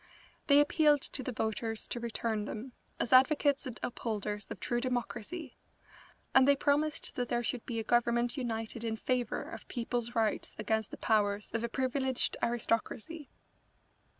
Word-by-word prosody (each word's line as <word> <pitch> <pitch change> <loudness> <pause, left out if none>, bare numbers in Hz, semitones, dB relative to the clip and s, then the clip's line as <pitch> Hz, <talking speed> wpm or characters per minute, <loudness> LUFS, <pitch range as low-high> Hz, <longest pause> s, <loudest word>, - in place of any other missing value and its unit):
They 285 0 +7
appealed 295 -1 +4
to - - -5
the 255 - -3
voters 220 0 -2
to 240 - -2
return 225 -2 -2
them, 225 +5 -6 0.3
as 245 - 0
advocates 285 +1 +5
and 245 - -6
upholders 210 -3 -3
of - - -6
true 240 0 -1
democracy, 255 +4 -3 0.7
and 265 0 +7
they 280 - +7
promised 290 +2 +1
that 245 -1 -2
there 240 0 0
should 240 0 -3
be 235 - -3
a 225 - -1
Government 240 +1 +2
united 230 -3 -3
in 225 -1 -1
favour 245 0 -1
of - - -9
people's 240 -1 -3
rights 220 -2 0
against 220 0 0
the - - -8
powers 210 -2 +1
of 230 0 -1
a 235 - -1
privileged 260 0 0
aristocracy. 240 +6 -1
240 Hz, 155 wpm, -32 LUFS, 225-265 Hz, 0.7 s, They